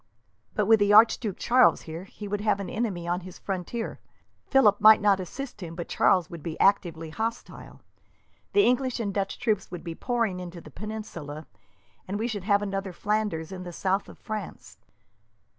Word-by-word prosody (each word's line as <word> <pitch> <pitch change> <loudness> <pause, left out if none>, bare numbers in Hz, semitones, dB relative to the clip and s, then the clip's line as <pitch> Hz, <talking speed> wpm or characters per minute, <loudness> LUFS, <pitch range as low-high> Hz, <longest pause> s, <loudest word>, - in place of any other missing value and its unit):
"But 210 - +1
with 220 +1 +5
the 205 0 +3
Archduke 215 -2 +5
Charles 250 +2 +4
here, 165 +3 -7
he 205 +1 -9
would 205 0 -2
have 210 -1 +1
an 200 - -5
enemy 200 -7 -2
on 175 +1 0
his 185 0 -11
frontier. 195 +4 -4 0.5
Philip 215 -7 +4
might 215 +1 +9
not 205 -2 +3
assist 245 +5 -7
him, 165 -2 -7
but 170 -1 -5
Charles 180 -4 +3
would 170 -2 -9
be 160 +1 -6
actively 170 -5 +2
hostile. 225 +6 -5 0.7
The 405 - +5
English 250 0 +1
and 205 -4 -2
Dutch 195 -1 -2
troops 210 -5 -1
would 175 -2 -7
be 170 -2 -5
pouring 230 -2 -1
into 175 -1 -7
the 155 -2 -13
peninsula, 170 -7 -7 0.6
and 195 +2 -3
we 225 +3 -1
should 205 -6 -4
have 205 -1 +3
another 195 -2 -3
Flanders 205 -5 -1
in 185 -1 -6
the 180 -1 -7
south 190 +3 -1
of - - -13
France." 215 -4 -7
200 Hz, 180 wpm, -27 LUFS, 175-215 Hz, 0.7 s, might